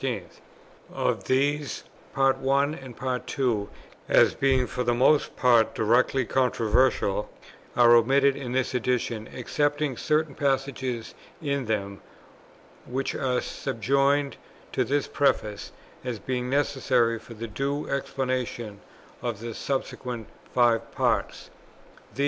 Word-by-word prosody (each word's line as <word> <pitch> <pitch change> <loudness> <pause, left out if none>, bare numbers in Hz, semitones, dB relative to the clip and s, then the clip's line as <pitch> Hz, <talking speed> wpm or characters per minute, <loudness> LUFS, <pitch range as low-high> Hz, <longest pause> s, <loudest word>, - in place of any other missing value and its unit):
Of - - -1
these 145 +2 0 0.3
Parts 135 -1 +3
1 140 +2 +2
and 125 -2 -5
2, 120 -7 0 0.4
as - - +5
being 130 -2 +2
for 125 - -3
the 120 0 +1
most 135 +5 +3
part 120 -3 +4
directly 125 +4 +2
controversial, 120 -4 +1 0.5
are 120 -1 +7
omitted 135 +4 +4
in 130 -3 -5
this 130 0 0
Edition, 120 -3 -1
excepting 145 +2 -1
certain 155 -1 0
passages 135 -4 -2 0.3
in 140 -3 -2
them, 100 -2 -2 0.9
which 135 +2 -2
are 130 -2 0
subjoined 140 +4 0 0.3
to 130 - +1
this 140 +4 0
Preface, 105 -7 0 0.3
as 125 -3 -3
being 125 +4 -3
necessary 130 -4 +1
for 115 - -12
the 115 +2 -5
due 140 +6 -2
explanation 125 -6 -3 0.4
of 120 -4 -3
the 115 0 -6
subsequent 125 -3 -4 0.3
five 115 -2 +2
Parts. - - -1
130 Hz, 115 wpm, -26 LUFS, 120-135 Hz, 0.9 s, are